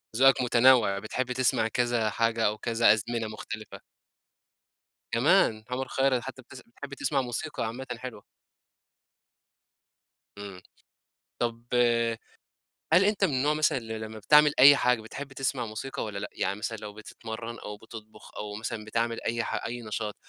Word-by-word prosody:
ذوقك 135 +2 +5
متنوع، 120 -4 +4
بتحب 125 +4 -3
تسمع 125 -3 +2
كذا 120 -1 0
حاجة 115 +1 0
أو 105 +1 +1
كذا 115 -1 +3
أزمنة 115 +1 -2
مختلفة. 110 0 -8 1.3
كمان! 110 -1 +3
عمر 130 +1 -3
خيرت 135 -2 +1
حتّى 130 +1 -8
بتس 130 0 -13
بتحب 140 +4 -11
تسمع 140 0 0
موسيقى 130 +3 -3
عامةً 120 +4 -5
حلوة. 125 -4 -8 2.1
إمم، 100 -3 -9 0.8
طَب 115 -1 -2 1.3
هل 185 - +6
أنت 205 -1 +1
من 175 -7 +2
النوع 140 +4 +2
مثلًا 155 -1 +2
اللي 110 -2 -6
لمّا 110 0 -7
بتعمل 150 +7 +5
أي 140 +2 +10
حاجة، 125 -3 +2
بتحب 135 +5 -8
تسمع 135 -2 -1
موسيقى 115 +5 -5
والّا 105 -2 -5
لأ؟ - - -5
يعني 100 +2 -2
مثلًا 110 +1 -3
لو 105 -1 -8
بتتمرّن 115 +2 -8
أو 105 0 -8
بتطبخ 110 -1 -13
أو 105 -1 -5
مثلًا 110 0 -5
بتعمل 115 +1 -1
أي 115 0 -1
ح - - -3
أي 120 +1 -5
نشاط، 105 -1 -4
115 Hz, 150 wpm, -27 LUFS, 110-130 Hz, 2.1 s, أي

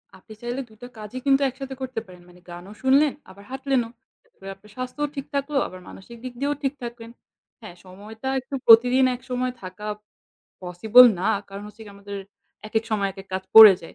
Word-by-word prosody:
আপনি 190 +3 -14
চাইলে 240 +3 -4
২টা 220 +3 -12
কাজই 215 +3 -8
কিন্তু 275 0 +3
একসাথে 265 +1 -8
করতে 255 -3 -4
পারেন। 180 -1 -15
মানে 180 0 -18
গানও 175 +4 -10
শুনলেন 275 +2 +3 0.2
আবার 195 +2 -15
হাঁটলেনও। 265 -3 -1 0.3
তাহলে 475 - -13
আপনার 210 - -20
স্বাস্থ্যও 255 +4 -4
ঠিক 275 -1 -5
থাকলো 280 +1 -1
আবার 185 - -11
মানসিক 235 +5 -12
দিক 255 -1 -7
দিয়েও 285 +2 -1
ঠিক 270 0 0
থাকবেন। 235 -1 -8 0.5
হ্যাঁ, 210 -6 -11
সময়টা 210 +6 -10
একটু 260 +2 -7
প্রতিদিন 250 +3 +6
একসময় 250 0 -3
থাকা 185 +2 -9 0.8
possible 210 +8 +6
না। 185 - -1 0.2
কারণ 200 +1 -9
হচ্ছে 210 +1 -15
গিয়ে 205 -1 -13
আমাদের 200 0 -8 0.5
একেক 220 +1 -1
সময় 205 -2 0
একেক 195 0 -12
কাজ 190 - -3
পড়ে 220 -2 +12
যায়। 165 - -12
230 Hz, 180 wpm, -23 LUFS, 200-260 Hz, 0.8 s, পড়ে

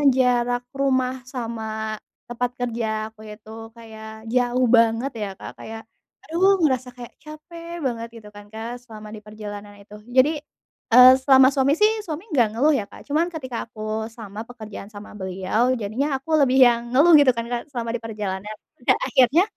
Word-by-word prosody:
jarak 245 -1 +1
rumah 260 -2 0
sama 220 -3 -4 0.3
tempat 240 +1 -2
kerja 235 -2 -2 0.3
aku 215 - -17
itu 210 0 -13 0.3
kayak 220 -1 -11
jauh 250 0 +2
banget 230 +4 +2
ya, 205 - -2
Kak, - - -8
kayak 225 0 -8 0.4
aduh 380 +4 +3
ngerasa 260 -3 0
kayak 240 -1 -10
capek 335 +2 -10
banget 230 -2 -2
gitu 215 -2 -13
kan, 205 0 -11
Kak, 230 +3 -6
selama 215 -3 -11
diperjalanan 210 -1 -9
itu, 205 +1 -14 0.2
jadi, 265 +4 +6 0.6
eee, 250 +1 +10
selama 265 -1 +7
suami 275 +1 +2
sih, 425 +1 +5
suami 320 +1 -5
gak 240 -4 +4
ngeluh 300 +4 +4
ya, - - -3
Kak, - - -12
cuman 310 +4 +1
ketika 260 -7 -5
aku 220 -2 -12 0.3
sama 220 -2 -8
pekerjaan 215 -4 -9
sama 205 0 -11
beliau 190 +6 0
jadinya 220 +8 -1
aku 275 - -18
lebih 260 -1 +2
yang 235 -1 +3
ngeluh 300 +7 +5
gitu 280 -3 +5
kan, 230 - -2
Kak, 240 -1 -1
selama 235 -3 -4
diperjalanan, 210 -3 -5 0.3
dan - - +5
akhirnya 265 +6 +4
240 Hz, 165 wpm, -23 LUFS, 220-265 Hz, 0.6 s, eee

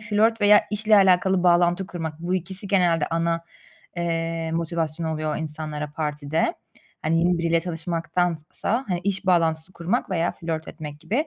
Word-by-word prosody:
flört 215 +2 +2
veya 205 0 +7
işle 215 +1 +3
alakalı 190 -1 +4
bağlantı 175 +1 +3
kurmak, 165 -4 -6
bu 175 +2 -1
ikisi 185 +2 -3
genelde 175 -5 +3
ana, 165 0 0 0.5
eee, 165 -1 -2
motivasyon 165 -1 -2
oluyor 155 -1 -2
insanlara 150 -1 -4
partide. 150 0 -1 0.5
Hani, 160 +1 +1
yeni 175 +1 +2
biriyle 170 0 +2
çalışmaktansa, 170 - -2
hani, 180 -2 -1
iş 200 0 -1
bağlantısı 165 -1 +2
kurmak 170 +2 -2
veya 170 -2 0
flört 160 -1 -4
etmek 150 -2 -8
gibi 230 - -1
170 Hz, 145 wpm, -24 LUFS, 160-185 Hz, 0.5 s, veya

